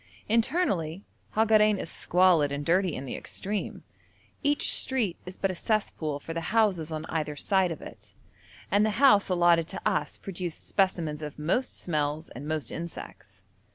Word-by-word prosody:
Internally 210 - 0 0.3
Hagarein 215 -1 +4
is - - -5
squalid 175 -4 +3
and 145 +1 -3
dirty 180 0 +2
in 135 - -5
the 130 - -5
extreme; 205 +1 -4 0.6
each 290 +1 +2
street 230 -10 +1
is 180 - -8
but 195 - 0
a - - -4
cesspool 170 -7 -1
for 165 - -7
the 165 - -3 0.2
houses 185 -8 +2
on 155 0 -4
either 155 -2 -2
side 190 +2 +2
of 160 - -6
it, - - -12 0.6
and 205 +1 +4
the 215 - +3
house 245 -8 +5
allotted 175 -2 +4
to 190 - -6
us 210 - -1
produced 180 -3 -6
specimens 170 -6 0
of 150 -1 -6
most 175 +12 -1
smells 155 -1 -2
and 135 +5 -8
most 155 -1 -2
insects. 105 - -8
175 Hz, 160 wpm, -28 LUFS, 155-205 Hz, 0.6 s, house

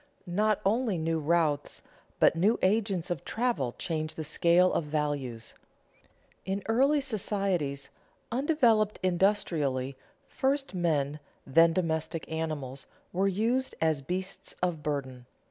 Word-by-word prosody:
_ - - -33 0.2
Not 210 +4 +1
only 220 -1 +1
new 165 0 0
routes 155 -2 0 0.4
but - - +5
new 200 +8 +3
agents 195 -3 +1
of 165 -6 -3
travel 225 - -1
change 155 -3 -3
the 160 - -4
scale 170 +4 +3
of 160 - 0
values. 145 -6 -3 0.9
In 195 +1 -3
early 270 +6 +3
societies, 195 - -1 0.4
undeveloped 235 -6 +2
industrially, 165 -8 +1 0.3
first 270 -1 -1
men, 155 -5 0 0.3
then 165 +5 +5
domestic 165 -2 -2
animals, 150 -5 -4 0.3
were 190 +2 +2
used 230 +7 0
as 160 -3 +1
beasts 185 +7 -5
of 175 -4 0
burden. 130 -4 -4
170 Hz, 120 wpm, -29 LUFS, 150-210 Hz, 0.9 s, but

